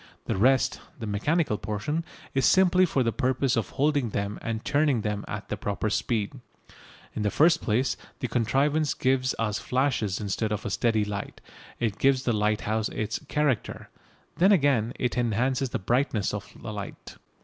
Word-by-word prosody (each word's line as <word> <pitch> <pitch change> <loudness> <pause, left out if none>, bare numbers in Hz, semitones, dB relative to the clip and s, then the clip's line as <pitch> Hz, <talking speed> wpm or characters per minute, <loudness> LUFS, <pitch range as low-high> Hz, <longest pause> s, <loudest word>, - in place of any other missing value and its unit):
The - - -1
rest, 130 +7 +3 0.2
the 115 - -6
mechanical 105 +4 0
portion, 110 +11 -2 0.3
is 135 - +3
simply 185 -1 +5
for 135 -4 +1
the 115 - +1
purpose 130 +3 +1
of 115 - -1
holding 145 -3 +1
them 100 0 -3
and 110 -1 -4
turning 145 -4 +2
them 105 -1 -2
at - - -6
the - - -2
proper 105 +1 -2
speed. 110 -1 -1 0.8
In - - -3
the 105 - +1
first 160 +7 +4
place, 120 +5 +1 0.2
the 125 - -2
contrivance 140 +6 +1
gives 130 0 +1
us 110 -1 -1
flashes 125 -7 0
instead 105 +1 -2
of 105 0 -3
a 105 - -2
steady 110 -1 +1
light; 100 -1 -5 0.4
it 110 -4 -1
gives 135 -1 +3
the 120 - +1
lighthouse 105 +1 0
its 110 0 -3
"character." 150 -6 -1 0.5
Then 190 +4 +5
again 135 - +3
it 125 0 -1
enhances 125 +3 0
the - - -2
brightness 120 -1 0
of - - -5
the - - -6
light. - - -8
120 Hz, 170 wpm, -27 LUFS, 105-140 Hz, 0.8 s, simply